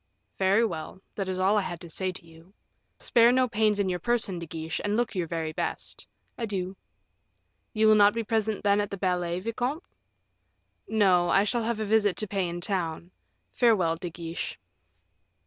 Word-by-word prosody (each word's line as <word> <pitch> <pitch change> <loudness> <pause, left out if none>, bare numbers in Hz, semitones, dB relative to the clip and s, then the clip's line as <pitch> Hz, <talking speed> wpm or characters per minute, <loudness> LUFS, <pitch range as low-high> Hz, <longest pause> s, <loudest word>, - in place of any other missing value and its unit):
"Very 195 +4 +4
well; 165 -2 -5
that 195 -2 -3
is 185 - -2
all 195 +3 +3
I - - +3
had 175 -3 -5
to 175 - -8
say 185 +3 -3
to 180 - -11
you. 165 +4 -18 0.4
Spare 235 0 +4
no 255 0 +3
pains 215 -2 +1
in 200 - +1
your 180 -1 -1
person, 215 -3 0
De 170 - -7
Guiche, 160 +1 -4
and 205 +1 0
look 240 -1 0
your 180 -3 -2
very 160 -1 -3
best. - - -4 0.3
Adieu." 195 -5 -3 1.0
"You 220 -1 +3
will 215 - +7
not 205 0 +5
be 230 - -1
present, 220 -1 -1
then, 205 0 +3
at 205 - -3
the 200 - -5
ballet, 180 -2 -1
vicomte?" 245 - -2 1.0
"No; 185 -5 +3
I 195 - +4
shall 235 +3 0
have 230 -1 -1
a 215 - -1
visit 210 -2 +2
to 215 - 0
pay 190 -2 -1
in 175 +1 -5
town. 175 -2 -3 0.4
Farewell, 195 -9 +3
De 175 +1 -6
Guiche." 170 0 -5
195 Hz, 185 wpm, -27 LUFS, 175-220 Hz, 1.0 s, will